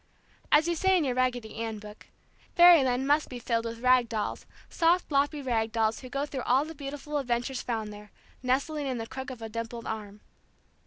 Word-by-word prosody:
As 310 +2 +5
you 345 - +1
say 380 +3 +3
in 340 - +1
your 260 -3 0
Raggedy 245 -3 -1
Ann 225 -1 -3
book, 210 0 -12 0.5
"Fairyland 275 -8 +6
must 295 +2 +2
be 250 - -6
filled 230 -1 -1
with 230 0 -6
rag 250 -2 +4
dolls, 215 -2 -3 0.2
soft 345 0 +2
loppy 285 +1 +1
rag 225 -3 0
dolls 220 -1 +1
who 255 - -10
go 275 +3 -2
through 275 -3 -5
all 260 +4 +2
the 320 - -8
beautiful 290 0 -5
adventures 245 0 -2
found 220 -3 -3
there, 210 0 -12 0.3
nestling 280 +3 0
in 255 -2 -2
the 225 - -4
crook 265 +3 -7
of 245 -3 -8
a - - -4
dimpled 230 +1 -5
arm." 210 -1 -6
255 Hz, 200 wpm, -28 LUFS, 230-285 Hz, 0.5 s, Fairyland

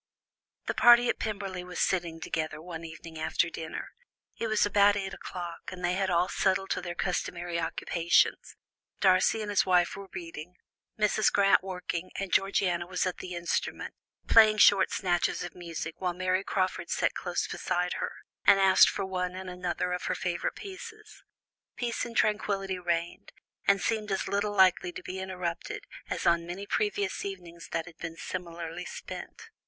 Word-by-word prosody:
The - - -1
party 240 0 +7
at - - 0
Pemberley 195 -4 -3
were 180 0 -10
sitting 170 -4 0
together 155 -1 -3
one 165 0 -7
evening 165 0 -9
after 160 +1 +1
dinner. 160 -1 -6 0.5
It 230 - -1
was 215 -1 +3
about 205 0 +5
eight 195 -1 -3
o'clock, 175 -2 -7
and 180 -1 -4
they 175 - +1
had 190 0 0
all 175 0 +3
settled 195 0 0
to - - 0
their 175 -1 -5
customary 175 -1 -2
occupations; 170 0 +1 0.4
Darcy 190 +3 +4
and 205 - -4
his 205 - +4
wife 180 -2 +3
were 200 0 -8
reading, 165 0 -8 0.4
Mrs. 210 0 +3
Grant 195 -1 +5
working 180 -2 -4
and 195 -2 -4
Georgiana 180 -3 +2
was 180 +1 -1
at 185 - -2
the 180 -1 -6
instrument, 170 0 -2 0.3
playing 215 -1 +7
short 200 -2 +6
snatches 175 -3 0
of 175 - -6
music 165 -2 -6
while 180 -2 -1
Mary 185 +1 0
Crawford 185 -2 -1
sat - - +1
close - - -2
beside - - -1
her, 480 -1 -3 0.3
and 195 - +6
asked 190 -1 +7
for 195 - -3
one 180 -1 -2
and 185 0 -6
another 180 0 -2
of 180 - -3
her - - 0
favourite 175 0 -2
pieces. 430 +2 -10 0.5
Peace 240 -1 -2
and 230 - -6
tranquility 195 -3 +1
reigned, 170 -1 -2 0.3
and 200 0 +5
seemed 215 -1 -1
as 195 - -1
little 205 +1 -1
likely 185 -2 +4
to - - -9
be 185 +1 -5
interrupted 190 - -4 0.2
as - - -3
on 170 0 +3
many 185 +3 -5
previous 205 -2 -1
evenings 175 -4 -7
that 165 -1 -2
had 165 -2 -13
been 165 -1 -6
similarly 170 0 -5
spent. 455 0 -8
185 Hz, 170 wpm, -29 LUFS, 175-200 Hz, 0.5 s, party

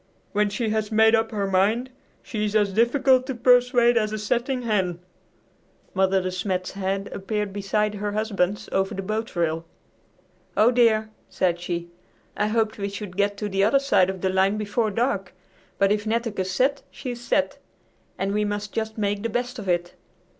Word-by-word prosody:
When 210 0 +2
she 220 +2 -2
has 215 0 -1
made 220 +1 +5
up 225 0 +3
her 205 -2 -2
mind 205 +7 +1 0.3
she 215 -3 -3
is 210 0 -2
as 205 -2 +2
difficult 255 +3 +3
to 265 - -3
persuade 245 0 +4
as 215 -2 +1
a 215 - -2
setting 245 +4 -1
hen." 190 -6 0 1.0
Mother 190 0 +3
De 185 - -2
Smet's 185 0 -2
head 195 0 -2
appeared 205 0 -3
beside 205 +1 0
her 205 0 -3
husband's 205 -2 -1
over 195 0 0
the 195 - -4
boat 215 +3 -3
rail. 165 -1 0 0.9
"Oh, 220 +3 +6
dear!" 220 -3 +3 0.2
said 175 -2 0
she; 170 -1 -4 0.4
"I 210 - +1
hoped 220 -1 0
we 200 0 -2
should 200 -2 -7
get 200 +1 +1
to 210 - -3
the 195 -1 +1
other 225 +7 +4
side 270 -9 +3
of 190 -1 -5
the 190 - +1
line 190 +2 +2
before 215 +2 0
dark, 200 -4 -1 0.4
but 195 0 +3
if 210 +1 0
Netteke's 220 -4 -1
set, 265 +9 +1
she's 245 -3 -6
set, 240 - 0 0.6
and 195 +1 -1
we 210 0 +1
must 205 0 -3
just 220 0 -3
make 205 -1 -1
the 230 - -2
best 245 +2 -3
of 195 -3 -5
it. 175 0 0
210 Hz, 180 wpm, -24 LUFS, 195-230 Hz, 1.0 s, Oh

